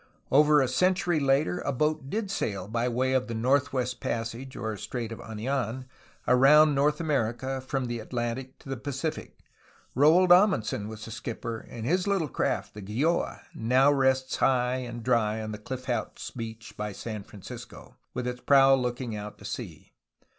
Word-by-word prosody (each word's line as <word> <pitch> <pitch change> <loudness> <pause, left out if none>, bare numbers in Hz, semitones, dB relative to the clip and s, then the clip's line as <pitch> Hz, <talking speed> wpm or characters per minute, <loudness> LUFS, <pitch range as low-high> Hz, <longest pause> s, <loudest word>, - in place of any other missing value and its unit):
Over 150 +1 +6
a - - +1
century 180 +4 +2
later 140 +5 +2
a 140 - -2
boat 150 +1 -1
did 210 +1 -2
sail 100 - -2
by 115 +3 0
way 130 +2 0
of 130 -1 +1
the 115 - -4
"Northwest 130 +1 +1
Passage," 115 +3 -4
or 110 -3 -3
"Strait 115 +2 -5
of 115 - -7
Anidn," 120 +2 -3 0.4
around 145 +4 +6
North 150 +2 +2
America 130 -3 -1
from 130 0 -2
the 120 -1 -3
Atlantic 120 +3 -4
to - - -14
the 135 - -3
Pacific. 140 +4 -4 0.6
Roald 165 +7 +5
Amundsen 175 - +4
was 110 0 -8
the 115 - -9
skip 115 0 -6
per, 115 -1 -3
and 115 0 -8
his 180 +8 +1
little 190 -7 +1
craft, - - -1
the 105 - -8
Gjoaj 130 - -1
now 130 +5 +3
rests 130 -1 +1
high 125 -1 +2
and 120 -2 -6
dry 110 -3 +1
on 110 0 -4
the 105 - -6
Cliff 130 +4 -6
House 125 -2 -3
Beach 115 -2 -7
by 105 -1 -4
San 110 +1 -6
Francisco, 100 0 -11 0.2
with 125 - -2
its 125 0 -4
prow 135 -1 +6
look 125 -2 0
ing 120 -4 -4
out 105 0 -7
to - - -13
sea. - - -7
130 Hz, 175 wpm, -28 LUFS, 115-140 Hz, 0.6 s, Over